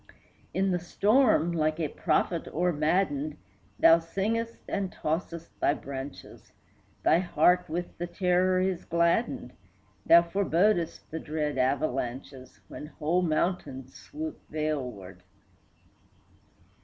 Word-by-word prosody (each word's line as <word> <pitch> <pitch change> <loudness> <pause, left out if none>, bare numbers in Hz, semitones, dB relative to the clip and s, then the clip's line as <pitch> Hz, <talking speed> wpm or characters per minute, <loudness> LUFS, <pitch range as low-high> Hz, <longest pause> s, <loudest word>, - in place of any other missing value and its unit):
In 190 0 +1
the 180 - 0
storm, 205 - +3
like 155 -1 0
a 160 - 0
prophet 170 +1 0
o'ermaddened, 155 -2 0 0.4
Thou 165 0 +7
singest 220 +7 -2
and 195 -2 -2
tossest 165 +1 -3
thy 145 - +2
branches; 135 0 -9 0.5
Thy 165 - +4
heart 180 0 +2
with 175 +2 -5
the 175 - -3
terror 185 0 +2
is 185 -1 -1
gladdened, 170 +7 0 0.5
Thou 170 0 +8
forebodest 175 0 0
the 160 - -4
dread 150 -3 -3
avalanches, 130 -1 -2
When 150 - -8
whole 160 +3 -1
mountains 155 -6 -2
swoop 315 +2 -7
valeward. 125 -12 -4
165 Hz, 105 wpm, -28 LUFS, 150-180 Hz, 0.5 s, Thou